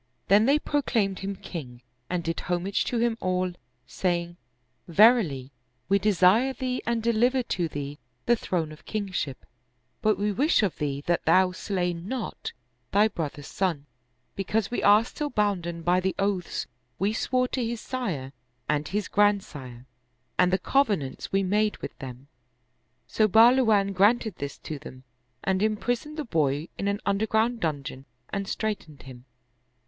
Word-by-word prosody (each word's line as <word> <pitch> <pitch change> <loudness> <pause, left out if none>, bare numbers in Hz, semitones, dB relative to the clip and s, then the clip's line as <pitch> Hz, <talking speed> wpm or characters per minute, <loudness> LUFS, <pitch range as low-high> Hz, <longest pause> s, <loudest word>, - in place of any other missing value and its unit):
Then 210 +4 +6
they 280 +2 +5
proclaimed 230 -10 0
him 195 +1 -4
king 125 -10 -8 0.3
and 180 -1 -1
did 165 0 -2
homage 180 +3 -1
to 245 - -1
him 230 0 +1
all, 185 0 0 0.3
saying, 175 -2 -1 0.3
" 125 +1 -46
Verily, 170 - +4 0.4
we 200 0 +4
desire 210 +6 +4
thee 255 -1 -2
and 235 -1 0
deliver 240 +3 +2
to 175 -7 -1
thee 145 -1 -6 0.3
the 240 - +4
throne 170 -8 -2
of 155 - -13
kingship; 190 -10 -3 0.6
but 215 -2 +3
we 210 +1 0
wish 275 - +3
of 195 - 0
thee 140 -1 -2
that 175 0 0
thou 185 0 +5
slay 180 -1 -1
not 190 +10 -5 0.4
thy 210 +2 +4
brother's 145 -6 -5
son, 165 -6 -1 0.5
because 200 +2 -1
we 245 - -1
are 210 +2 +6
still 295 +4 -4
bounden 180 -8 -1
by 175 +2 +3
the 190 +1 -1
oaths 195 -3 -1 0.3
we 200 +3 +1
swore 255 +2 +1
to 255 - -1
his 230 0 -2
sire 180 - -4 0.3
and 150 0 0
his 210 +1 -2
grandsire 150 -12 0 0.5
and 180 0 +3
the 190 - +3
cov 275 +8 +2
enants 145 -10 -3
we 195 0 +2
made 210 +3 +1
with - - -7
them." 130 0 -9 0.8
So 215 - +2
Bahluwan 220 -2 +5
granted 210 +3 +3
this 140 0 -5
to 155 -2 -6
them 130 -2 -11 0.4
and 190 0 +1
imprisoned 245 +8 -1
the 305 - -3
boy 150 - 0
in 200 - -1
an 200 +1 -1
underground 220 +4 +1
dungeon 140 -5 -3 0.2
and 200 0 -3
straitened 195 -11 -4
him. 125 -1 -12
195 Hz, 155 wpm, -26 LUFS, 165-220 Hz, 0.8 s, Then